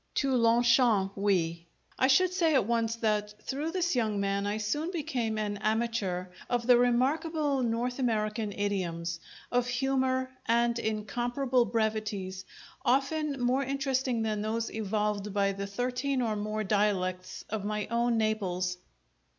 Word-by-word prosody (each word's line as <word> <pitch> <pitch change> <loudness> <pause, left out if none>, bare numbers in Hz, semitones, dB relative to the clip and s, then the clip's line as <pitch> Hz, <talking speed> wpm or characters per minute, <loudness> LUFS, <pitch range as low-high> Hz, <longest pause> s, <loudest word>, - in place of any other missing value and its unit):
To 275 -2 +1
Longchamps 235 -4 +4
we!" 170 -4 0 0.3
I 260 - +5
should 365 +7 +4
say 330 -5 +2
at 260 - +3
once 230 0 0
that 210 -2 -1
through 285 +4 -3
this 350 -2 0
young 215 -4 0
man 200 0 0
I 205 +1 -1
soon 295 +10 -1
became 250 -10 -2
an 205 -1 -2
amateur 215 -4 -1 0.2
of 240 -1 0
the 245 0 +7
remarkable 280 +4 +1
North 245 +2 -1
American 215 -3 0
idioms, 175 -5 -2 0.3
of 245 0 +2
humour 260 0 0 0.2
and 235 0 +2
incomparable 240 +4 0
brevities 215 -4 -2 0.4
often 275 +2 +1
more 255 +3 +2
interesting 265 -3 0
than 215 -1 -1
those 225 +2 -2
evolved 210 -1 -2
by 200 -1 +2
the 200 0 -4
thirteen 250 +5 -1
or 220 -2 0
more 215 +1 -2
dialects 190 -3 -1
of 215 -2 -2
my 210 0 -2
own 235 0 +2
Naples. 185 -5 0
225 Hz, 140 wpm, -29 LUFS, 205-255 Hz, 0.4 s, the